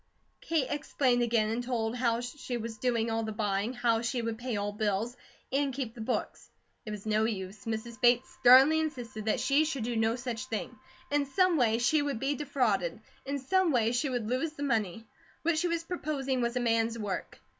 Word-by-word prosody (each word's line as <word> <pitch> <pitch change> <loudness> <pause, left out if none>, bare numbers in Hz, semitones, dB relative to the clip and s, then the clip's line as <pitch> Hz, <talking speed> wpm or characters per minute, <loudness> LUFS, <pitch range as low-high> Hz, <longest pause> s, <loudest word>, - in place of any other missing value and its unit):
Kate 320 -5 +1
explained 270 -4 +1
again 230 -2 +2
and 235 +2 -2
told 235 -2 -1
how 235 -2 +1
she 245 0 -5
was 225 -1 -6
doing 230 -2 +1
all 225 0 0
the 220 -1 -3
buying, 210 0 -1
how 235 -2 +1
she 240 +2 -1
would 230 -1 -3
pay 245 -3 -2
all 205 0 -1
bills, 210 +3 -1 0.4
and 275 -1 0
keep 255 -5 -3
the 235 - -9
books. 235 +3 -3 0.4
It - - -3
was 210 -1 -6
no 215 0 +2
use. 195 -2 -4
Mrs. 225 +2 -4
Bates 245 0 +4
sternly 265 +6 +7
insisted 245 -9 -4
that 220 - +1
she 285 +2 +3
should 280 -6 -2
do 240 +1 -2
no 225 +1 +2
such 245 -4 -4
thing. 220 - -4 0.4
In 290 -1 +1
some 370 +4 +3
way 230 -6 +3
she 280 +6 +3
would 285 -5 -2
be 270 +3 0
defrauded. 245 - 0 0.3
In 280 +1 -1
some 360 +6 +2
way 230 -4 +2
she 245 +4 0
would 245 -4 -2
lose 260 +7 -1
the 285 - -6
money. 225 -5 -1 0.4
What 325 -1 +2
she 350 - +1
was 335 -1 -1
proposing 280 -7 -2
was 235 +1 -1
a - - +1
man's 230 -1 +1
work. 205 -4 -4
240 Hz, 205 wpm, -30 LUFS, 225-275 Hz, 0.4 s, sternly